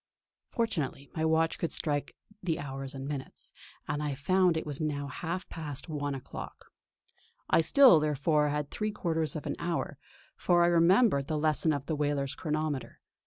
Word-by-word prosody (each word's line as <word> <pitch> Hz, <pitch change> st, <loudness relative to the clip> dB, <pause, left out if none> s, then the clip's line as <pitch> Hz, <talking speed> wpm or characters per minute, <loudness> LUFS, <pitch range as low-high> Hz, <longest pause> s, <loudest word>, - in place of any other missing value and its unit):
Fortunately 160 Hz, -, -2 dB
my 160 Hz, -, -1 dB
watch 160 Hz, 0 st, +2 dB
could 170 Hz, -, -1 dB
strike 145 Hz, -2 st, -2 dB, 0.3 s
the 170 Hz, -3 st, -1 dB
hours 135 Hz, -1 st, -6 dB
and 135 Hz, 0 st, -5 dB
minutes, 140 Hz, -2 st, -6 dB, 0.3 s
and 145 Hz, +1 st, -2 dB
I 145 Hz, -2 st, -2 dB
found 180 Hz, +4 st, +3 dB
it 160 Hz, -, -3 dB
was 145 Hz, 0 st, -4 dB
now 145 Hz, -2 st, -1 dB
half 170 Hz, +7 st, -4 dB
past 150 Hz, -2 st, -6 dB
one 145 Hz, -2 st, -2 dB
o'clock. 130 Hz, -, -9 dB, 0.8 s
I -, -, +6 dB
still, 245 Hz, -, +7 dB
therefore, 150 Hz, 0 st, +2 dB
had 145 Hz, 0 st, -2 dB
three 215 Hz, 0 st, -2 dB
quarters 160 Hz, -7 st, -1 dB
of 155 Hz, -, -5 dB
an -, -, -2 dB
hour, 170 Hz, -4 st, -2 dB, 0.4 s
for 175 Hz, -1 st, +3 dB
I -, -, +5 dB
remembered 170 Hz, -, +4 dB
the 155 Hz, -, -1 dB
lesson 155 Hz, +1 st, +2 dB
of 140 Hz, -2 st, -2 dB
the 155 Hz, -, -1 dB
whaler's 145 Hz, -2 st, 0 dB
chronometer. 155 Hz, -2 st, -3 dB
155 Hz, 165 wpm, -30 LUFS, 145-165 Hz, 0.8 s, still